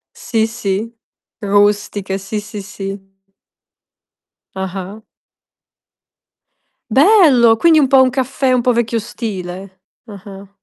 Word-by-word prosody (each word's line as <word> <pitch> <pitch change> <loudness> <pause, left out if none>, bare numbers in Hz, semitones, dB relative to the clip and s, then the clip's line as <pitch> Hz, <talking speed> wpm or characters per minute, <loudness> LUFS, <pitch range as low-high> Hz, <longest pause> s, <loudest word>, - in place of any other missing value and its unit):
Sì, 225 -2 -1
sì. 220 0 -4 0.5
Rustiche, 205 -1 0
sì, 195 +2 -5
sì, 205 -1 -8
sì. 195 0 -7 1.6
Ah-ah. 190 +2 -6 1.9
Bello! 270 - +5
Quindi 325 +1 +4
un 285 - +4
po' 265 0 +4
un 260 - +5
caffè 265 0 -1
un 250 -1 +1
po' 250 - +2
vecchio 230 -1 -1
stile. 190 -5 -7 0.2
Ah-ah. 200 -1 -12
210 Hz, 100 wpm, -16 LUFS, 195-245 Hz, 1.9 s, Bello